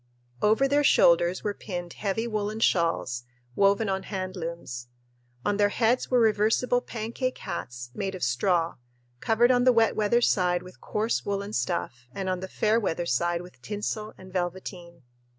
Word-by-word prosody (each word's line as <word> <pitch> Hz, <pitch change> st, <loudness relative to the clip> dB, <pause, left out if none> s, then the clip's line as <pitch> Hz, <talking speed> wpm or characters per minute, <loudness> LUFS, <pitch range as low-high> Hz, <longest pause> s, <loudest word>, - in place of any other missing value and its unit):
Over 220 Hz, +6 st, +4 dB
their 290 Hz, +2 st, +3 dB
shoulders 175 Hz, -7 st, +4 dB
were 210 Hz, -, -1 dB
pinned 175 Hz, -4 st, -6 dB
heavy 210 Hz, +3 st, -2 dB
woolen 215 Hz, -1 st, -2 dB
shawls, 165 Hz, -, +1 dB, 0.3 s
woven 200 Hz, +2 st, +3 dB
on 190 Hz, -1 st, -1 dB
hand 185 Hz, -1 st, -5 dB
looms. 165 Hz, -8 st, -6 dB, 0.6 s
On 205 Hz, -, +1 dB
their 205 Hz, 0 st, +4 dB
heads 230 Hz, +4 st, +1 dB
were 250 Hz, -, +4 dB
reversible 225 Hz, +3 st, +3 dB
"pancake" 240 Hz, +3 st, -3 dB
hats 125 Hz, 0 st, -6 dB
made 195 Hz, +2 st, -3 dB
of 185 Hz, -, -6 dB
straw, 165 Hz, +7 st, +1 dB, 0.4 s
covered 235 Hz, -, +3 dB
on 245 Hz, -1 st, +3 dB
the 255 Hz, -, +6 dB
wet 225 Hz, -2 st, +3 dB
weather 220 Hz, +3 st, +2 dB
side 180 Hz, -5 st, +2 dB
with 185 Hz, 0 st, -14 dB
coarse 220 Hz, +2 st, -1 dB
woolen 200 Hz, 0 st, -3 dB
stuff 125 Hz, 0 st, -2 dB
and 190 Hz, -1 st, -3 dB
on 185 Hz, -1 st, -1 dB
the 190 Hz, -, -5 dB
fair 215 Hz, +3 st, +2 dB
weather 175 Hz, -5 st, -1 dB
side 170 Hz, +5 st, 0 dB
with 180 Hz, -8 st, -15 dB
tinsel 210 Hz, -, -4 dB
and 185 Hz, 0 st, -13 dB
velveteen. 175 Hz, -2 st, -5 dB
195 Hz, 165 wpm, -27 LUFS, 175-220 Hz, 0.6 s, the